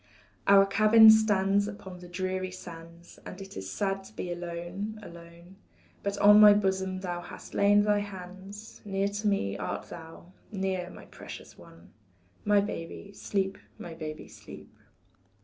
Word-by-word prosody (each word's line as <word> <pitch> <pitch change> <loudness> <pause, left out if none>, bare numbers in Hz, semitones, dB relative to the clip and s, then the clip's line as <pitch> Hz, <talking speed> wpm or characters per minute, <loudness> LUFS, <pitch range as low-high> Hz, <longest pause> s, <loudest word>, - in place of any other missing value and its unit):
Our 195 0 +7
cabin 215 +2 +7
stands 205 -2 +3
upon 190 -3 -9
the 180 - -11
dreary 185 +1 -3
sands, 170 -1 -12
And 185 - -9
it 195 0 -10
is 95 0 -6
sad 195 - -2
to - - -15
be 175 - -5
alone, 175 +5 -6
alone. 170 +2 -13 0.4
But 200 0 -3
on 210 +1 +7
my 210 -1 +9
bosom 190 -2 -1
thou 175 -2 -4
hast - - -11
lain 205 +1 +4
thy 210 0 +2
hands, 195 +2 -9
Near 195 -1 -1
to 205 +1 -3
me 100 - 0
art - - -5
thou, 165 +1 -11 0.2
near, 190 -3 -2
my - - -12
precious - - -11
one 85 +1 -17 0.5
My, 205 -1 +4
baby, 200 0 -7
sleep, 195 -1 -2 0.2
my 170 - -8
baby, 155 -1 -7
sleep. - - -13
190 Hz, 150 wpm, -28 LUFS, 175-205 Hz, 0.5 s, my